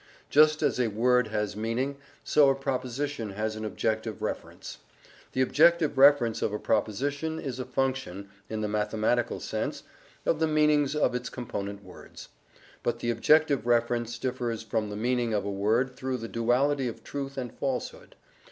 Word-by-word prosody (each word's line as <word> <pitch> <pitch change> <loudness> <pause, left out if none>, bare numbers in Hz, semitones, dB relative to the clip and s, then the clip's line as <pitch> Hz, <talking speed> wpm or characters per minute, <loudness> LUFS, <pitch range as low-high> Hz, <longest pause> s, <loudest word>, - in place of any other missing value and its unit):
Just 155 +1 +5
as - - +1
a 125 - +2
word 125 +3 +2
has 105 -1 -2
meaning, 120 +6 -2 0.3
so 145 -2 +5
a 135 - +3
proposition 135 -3 -3
has 110 +2 -2
an 110 - -6
objective 110 0 -2
reference. - - -6 0.5
The 130 - +2
objective 165 +3 +4
reference 135 -4 +5
of - - 0
a 105 - -2
proposition 145 +11 -1
is 130 -3 -5
a 130 - -3
function 130 -7 -2 0.2
(in 110 -1 -3
the 105 - -1
mathematical 105 +3 0
sense) - - -4 0.4
of 155 - +1
the 160 - +2
meanings 150 -2 +3
of 150 - +2
its 125 0 -3
component 100 -5 -5
words. - - -12 0.5
But 120 -1 -1
the 120 0 -1
objective 140 +1 +3
reference 120 0 +1
differs 120 -3 -3
from 110 -1 -2
the 105 - -5
meaning 120 0 0
of 100 -1 -1
a 100 - -2
word 110 +6 +1
through 130 0 -3
the 115 -1 -6
duality 125 +4 +1
of 115 - -7
truth 140 -1 -5
and 125 -3 -4
falsehood. 135 -2 -4
125 Hz, 165 wpm, -28 LUFS, 110-140 Hz, 0.5 s, Just